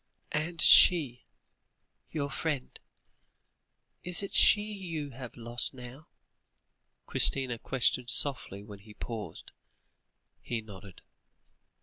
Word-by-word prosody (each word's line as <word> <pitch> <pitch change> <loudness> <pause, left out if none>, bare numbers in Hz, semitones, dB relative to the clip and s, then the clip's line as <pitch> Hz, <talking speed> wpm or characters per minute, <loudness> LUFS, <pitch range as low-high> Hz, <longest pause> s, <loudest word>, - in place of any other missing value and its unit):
"And 165 +2 -4
she 140 -9 +5 0.8
your 140 -3 -4
friend 150 -3 -5 1.2
is 180 +2 +2
it 200 - -7
she 205 - +5
you 175 -9 -7
have 125 -1 -11
lost 120 +3 0
now?" 125 +4 -12 1.0
Christina 130 -4 +2
questioned 125 -1 -1
softly, 120 -9 0
when 105 -1 -12
he 105 +1 -17
paused. 115 -3 -8 0.9
He 120 - -4
nodded. 100 -3 -14
130 Hz, 95 wpm, -29 LUFS, 115-155 Hz, 1.2 s, she